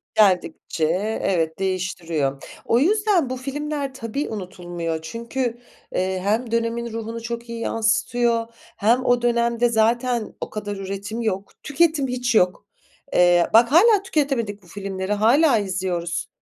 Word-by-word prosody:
Geldikçe 180 -5 +2 0.4
evet, 165 -3 0
değiştiriyor. 170 -7 -2 0.2
O 230 - +3
yüzden 395 - +2
bu 255 - -3
filmler 280 +1 -4
tabii 260 +3 -4
unutulmuyor 175 -5 -4
çünkü, 235 +7 -3 0.4
eee, 185 0 0
hem 225 +4 0
dönemin 230 0 -1
ruhunu 230 0 -5
çok 235 0 -6
iyi 230 0 -5
yansıtıyor 230 +1 +1 0.3
hem 235 +5 +2
o 245 -1 +3
dönemde 235 0 +2
zaten 235 +1 +1
o - - -4
kadar 205 -1 -5
üretim 200 +4 -5
yok, 200 -3 -2
tüketim 300 -1 +2
hiç 245 -2 -1
yok. 185 +1 +2 0.5
Eee, 175 -1 +5
bak 235 +3 +6
hâlâ 405 +4 +6
tüketemedik 255 - -1
bu - - -19
filmleri, 195 +1 -4
hâlâ 240 +6 +4
izliyoruz. 180 -3 -2
230 Hz, 130 wpm, -22 LUFS, 190-245 Hz, 0.5 s, bak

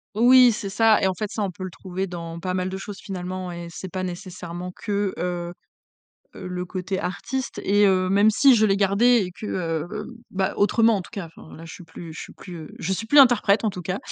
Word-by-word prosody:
Oui 250 +2 +7
c'est 210 -2 -4
ça, 220 +2 +4
et 190 - +3
en 185 - -1
fait 215 -2 -4
ça 215 - -3
on 195 - 0
peut 185 +1 -9
le 185 - -5
trouver 190 +1 -5
dans 170 -2 -7
pas 185 +1 -3
mal 185 0 -1
de 190 - -5
choses 200 +1 -8
finalement, 185 -1 -5
et 170 0 -7
c'est 190 +2 -7
pas 185 -1 -3
nécessairement 180 -1 -6
que, 200 +1 -2
heu 175 -1 -3 0.8
heu, - - -7
le 180 0 -4
côté 185 +1 -4
artiste 235 +9 -4
et 205 +1 +4
heu, 185 -1 +2
même 205 +2 +5
si 270 +5 +5
je 215 -1 +4
l'ai 195 0 +2
gardé 205 +3 +4
et 180 - -7
que, 210 - -8
heu 165 -4 -2
heu, 215 -1 -5 0.2
ben 190 0 -1
autrement 225 +1 +3
en 190 - -3
tout - - -13
cas, 200 -6 -5
enfin - - -13
là 165 - -10
je 165 - -9
suis 180 - -11
plus 165 0 -10
je - - -7
suis - - -10
plus, 180 -3 -10
heu, 155 - -9
je 190 +3 -2
suis 225 +4 -4
plus 290 - +3
interprète 235 -5 +6
en 210 - +1
tout 180 - -7
cas. 185 +3 -3
190 Hz, 250 wpm, -24 LUFS, 180-210 Hz, 0.8 s, Oui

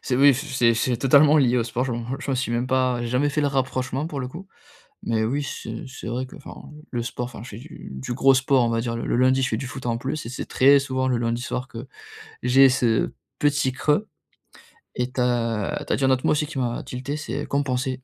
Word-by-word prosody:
C'est 125 - -1
oui. 140 +2 +7
F 130 - -3
c'est 115 -2 +4
c'est 120 +1 0
totalement 145 +4 +5
lié 125 -4 +4
au 120 - +2
sport 120 +2 -2
je 130 - -2
m'en 120 0 -4 0.2
je - - -4
m'en 135 - +1
suis 130 -1 -2
même 120 +1 0
pas 130 -1 +1
j'ai - - -2
jamais 125 +5 +1
fait 145 +1 -1
le 145 - +2
rapprochement 130 0 -1
pour 145 -4 -4
le 125 - -4
coup. 175 +8 -10 0.6
Mais 110 -1 0
oui, 135 +6 0
c'est 140 - -6
c'est 130 - -9
vrai 125 +3 -3
que - - -13
enfin, - - -11 0.3
le 120 - -2
sport 120 +1 -4
enfin 120 -3 -9
je 125 - -10
fais 105 - -9
du 115 - -11
du 65 - -5
gros 135 +2 +4
sport 135 -1 +3
on 120 - +1
va 115 0 0
dire 115 0 -3
le 115 - -4
le - - +1
lundi, 130 +1 +3
je 130 - +1
fais 110 - -1
du 130 - -5
foot 130 0 -8
en 115 0 0
plus 135 +3 -4
et - - -6
c'est 130 - -5
très 140 +2 +5
souvent 130 -1 -1
le 125 -2 +1
lundi 120 0 -1
soir 125 0 -4
que 115 -2 -9 0.6
j'ai 135 +2 +6
ce 120 -3 +1 0.3
petit 145 -2 +2
creux 150 +10 0 0.9
et 125 +1 -1
tu 130 - -2
as 115 -4 0
tu - - -2
as - - +3
dit 135 - -1
un 130 - +4
autre 130 -1 +1
mot - - +4
aussi 150 0 +1
qui 140 - -7
m'a 120 -2 -1
tilté, 130 +4 -5
c'est 150 - -4
compenser. 130 -2 -1
130 Hz, 265 wpm, -24 LUFS, 120-135 Hz, 0.9 s, oui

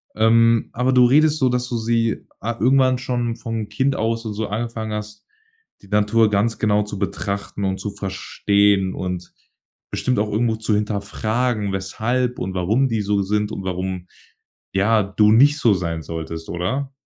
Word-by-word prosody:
Ähm, 115 +1 +4
aber 125 +2 +1
du 125 -1 +6
redest 150 +4 +4
so, 130 -3 +2
dass 125 0 -1
du 120 - -2
sie, 115 0 0
ah 115 0 -3
irgendwann 130 +1 +4
schon 120 -2 -2
von 115 -2 -5
Kind 135 0 0
aus 115 +1 -1
und 110 - -3
so 110 +1 -3
angefangen 110 0 -4
hast, 105 -1 -6 0.6
die - - -15
Natur 105 +2 +3
ganz 105 +3 +1
genau 105 -1 +2
zu 105 -1 -6
betrachten 100 0 -3
und 95 0 -1
zu 105 - -4
verstehen 100 0 +1
und 90 -1 -5 0.6
bestimmt 130 - 0
auch 105 0 -1
irgendwo 110 +1 +1
zu 110 0 -1
hinterfragen, 105 +2 -1
weshalb 120 +6 -1
und 95 +1 -3
warum 105 +9 +2
die 115 -4 -1
so 100 0 +1
sind 105 +2 -1
und 95 - -5
warum, 90 -1 -4 0.7
ja, 105 +2 +3
du 105 +2 +3
nicht 140 +7 +5
so 115 -7 +4
sein 85 -3 -3
solltest, 80 0 -6
oder? 130 +11 -2
110 Hz, 170 wpm, -21 LUFS, 100-120 Hz, 0.7 s, du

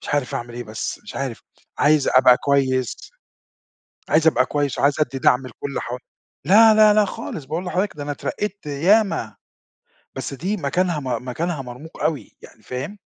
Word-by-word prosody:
مش - - -9
عارف 145 -4 -1
أعمل 120 0 -5
إيه 120 0 -6
بس 110 0 -5
مش - - -11
عارف، 130 -4 -4 0.4
عايز 150 -1 +3
أبقى 130 -1 +6
كويس 130 -4 0 1.1
عايز 160 +1 +4
أبقى 130 -5 +4
كويس 145 -2 -2
وعايز 140 +2 +2
أدّي 135 -3 -1
دعم 130 0 +3
لكلّ 140 +3 -5
ح 120 +1 -5 0.5
لا، 220 +5 +7
لا، 215 -1 +6
لا، 210 0 +4
خالص، 160 -6 -6
باقول 160 +6 -4
لحضرتك 185 +2 -1
ده 145 - -5
أنا 145 - -3
اترقيت 205 +6 -4
ياما، 165 - +1 0.8
بس - - -5
دي 190 +9 -2
مكانها 170 +1 0
م 125 -2 -4
مكانها 160 +3 -2
مرموق 130 +6 -10
أوي، 155 -3 -2
يعني - - -16
فاهم؟ 135 +11 -6
145 Hz, 170 wpm, -21 LUFS, 130-180 Hz, 1.1 s, لا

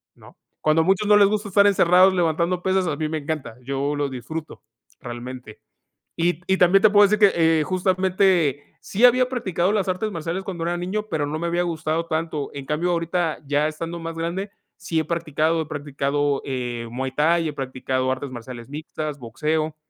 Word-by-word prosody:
¿no? - - -17 0.2
Cuando 155 +1 +3
a 160 - 0
muchos 195 +2 +2
no 210 - +6
les 205 -1 +6
gusta 210 +1 -1
estar 200 +1 +4
encerrados 185 -1 +5
levantando 170 +1 0
pesas, 190 -1 +1
a 150 - -2
mí 155 0 -1
me 155 0 -3
encanta, 145 -6 -5
yo 140 +2 -2
lo 145 -1 -1
disfruto, 145 +5 -7 0.4
realmente. 120 -2 -8 0.5
Y 170 0 0
y 190 - +2
también 185 +2 +5
te 215 - +6
puedo 205 0 +6
decir 210 +1 +1
que, 165 -1 +3
eh, - - +1
justamente 185 -4 +1 0.2
sí 220 +5 +2
había 250 +1 +5
practicado 195 -8 0
las 205 -3 0
artes 195 +4 -1
marciales 170 +3 -4
cuando 180 -3 -5
era 170 +1 -1
niño, 200 +5 -3
pero 155 -4 -1
no 150 +2 -3
me 170 - -2
había 175 +1 0
gustado 165 -1 -2
tanto. 160 -3 -2
En 140 -1 -7
cambio, 155 +5 -1
ahorita, 170 -1 -1
ya 145 +2 +1
estando 165 +2 -5
más 165 0 -6
grande, 170 +5 -3 0.3
sí 165 -1 -2
he 160 - -1
practicado, 160 0 0
he - - -12
practicado, 145 -1 -1
eh, 120 -3 -4
muay 130 +2 -3
thai, 165 +3 +2
he - - -6
practicado 130 -1 -2
artes 135 +2 -4
marciales 120 -1 -9
mixtas, 150 0 -5
boxeo. 155 +6 -2
165 Hz, 195 wpm, -23 LUFS, 145-185 Hz, 0.5 s, no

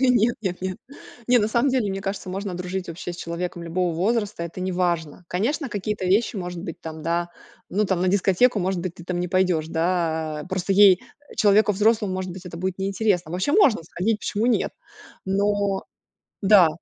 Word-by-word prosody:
Нет 240 -3 +4
нет 180 -2 -3
нет, 185 -1 -3 0.5
не 250 0 +6
на 210 - +2
самом 235 +5 +2
деле, 240 -6 +1
мне 195 - -3
кажется, 195 -1 -4
можно 195 0 -4
дружить 180 +1 -4
вообще 175 +1 -5
с - - -9
человеком 170 0 -4
любого 170 0 -1
возраста. 205 +1 0
Это 170 +2 -6
неважно. 175 -3 -1
Конечно, 260 - -1
какие-то 205 -1 -3
вещи, 210 +5 +2
может 180 -2 -5
быть, 170 -5 -7
там, 160 -1 -7
да, 170 +1 0 0.4
ну, 210 +2 +1
там, 190 -2 0
на 185 - +2
дискотеку, 200 +5 +3
может 185 -1 -1
быть, 175 -1 -4
ты 170 - -11
там 175 -1 -2
не 180 - -2
пойдёшь, 180 -4 +1
да, 160 -2 -1
а - - -7
Просто 185 +1 -1
ей, 195 -2 +7 0.4
человеку 210 0 +4
взрослому, 210 -1 +2
может 185 0 -3
быть, 185 0 -10
это 170 - -7
будет 185 +1 -3
неинтересно. 195 -3 0
Вообще 185 - -1
можно 280 - +5
сходить, 210 +6 -1
почему 215 +2 -1
нет? 250 - +1 0.5
Но 200 0 0 0.6
да. 195 -4 +7
185 Hz, 190 wpm, -24 LUFS, 175-205 Hz, 0.6 s, ей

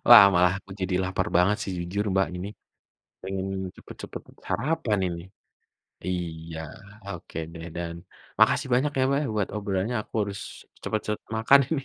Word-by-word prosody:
Lah, - - +13
malah 90 0 +5
aku 100 - -18
jadi 95 0 0
lapar 95 0 0
banget 95 +4 +4
sih, 95 - -3
jujur 90 +4 -1
Mbak 95 0 +3
ini. 90 +2 -4 0.7
Pengen, 95 0 -3 0.3
cepat-cepat - - -8 0.2
sarapan 115 - +1
ini. 85 -1 -4 0.9
Iya, 85 -3 -3 0.5
oke 90 -4 -7 0.2
deh, 80 -1 -7
dan, 85 -1 -3 0.5
makasih - - +5
banyak 135 +4 +3
ya 130 - +5
Mbak, 140 +1 +3
ya - - -1
buat 105 -2 +1
obrolannya, 105 +2 -1
aku - - -20
harus 100 -1 -3 0.4
cepat-cepat 105 0 -2
makan 125 +5 +7
ini 145 -4 +1
95 Hz, 150 wpm, -27 LUFS, 90-105 Hz, 0.9 s, Lah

